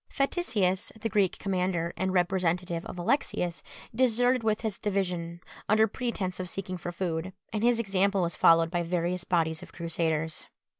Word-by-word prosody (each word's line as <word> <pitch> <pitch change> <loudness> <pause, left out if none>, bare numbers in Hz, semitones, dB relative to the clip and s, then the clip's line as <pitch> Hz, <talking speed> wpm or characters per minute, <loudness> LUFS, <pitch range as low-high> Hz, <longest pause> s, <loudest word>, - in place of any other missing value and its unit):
Faticius, 215 - 0
the 225 - -2
Greek 200 -4 +2
commander 180 -3 -1
and 190 0 -1
representative 180 -1 0
of - - -7
Alexius, 180 - 0 0.3
deserted 245 +1 +3
with 215 -1 +1
his 220 -4 -3
division 180 -4 -2 0.3
under 215 +1 +5
pretence 205 -6 -3
of 180 -1 -1
seeking 185 -1 -4
for 175 - -4
food, 175 0 -3 0.2
and 210 - -1
his 240 0 +4
example 200 -3 +1
was 170 - -2
followed 165 0 +5
by 175 -1 0
various 175 +1 -1
bodies 160 -2 +1
of - - -11
Crusaders. 160 -2 -1
185 Hz, 155 wpm, -28 LUFS, 170-210 Hz, 0.3 s, under